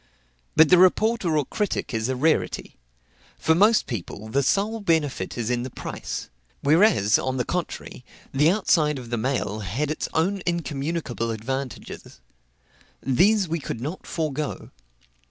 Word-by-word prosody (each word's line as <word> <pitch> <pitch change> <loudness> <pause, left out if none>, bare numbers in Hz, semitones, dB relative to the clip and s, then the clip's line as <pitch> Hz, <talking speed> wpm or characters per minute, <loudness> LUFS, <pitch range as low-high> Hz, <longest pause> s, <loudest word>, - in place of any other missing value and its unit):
But 160 0 +7
the 180 - +7
reporter 185 -2 +3
or 145 - +1
critic 210 - -2
is 110 +2 -1
a 130 - 0
rarity. 125 - 0 0.6
For 160 - +2
most 210 +6 +4
people, 110 -1 -6
the 140 +5 +2
sole 205 - +1
benefit 155 - 0
is 120 0 -1
in 120 -1 0
the 130 - -4
price. - - -6 0.3
Whereas, 140 - +4
on 130 0 -2
the 125 - 0
contrary, 180 -7 -4 0.3
the 145 +4 +4
outside 165 -6 +2
of 120 -2 -9
the 120 - 0
mail 110 -3 -1
had 115 - -2
its 155 - -3
own 190 +5 +1
incommunicable 150 -7 -2
advantages. 130 +4 -5 0.8
These 190 - +3
we 165 +1 -2
could 135 - -5
not 150 +9 -6
forego. 155 -2 -3
150 Hz, 145 wpm, -24 LUFS, 125-170 Hz, 0.8 s, But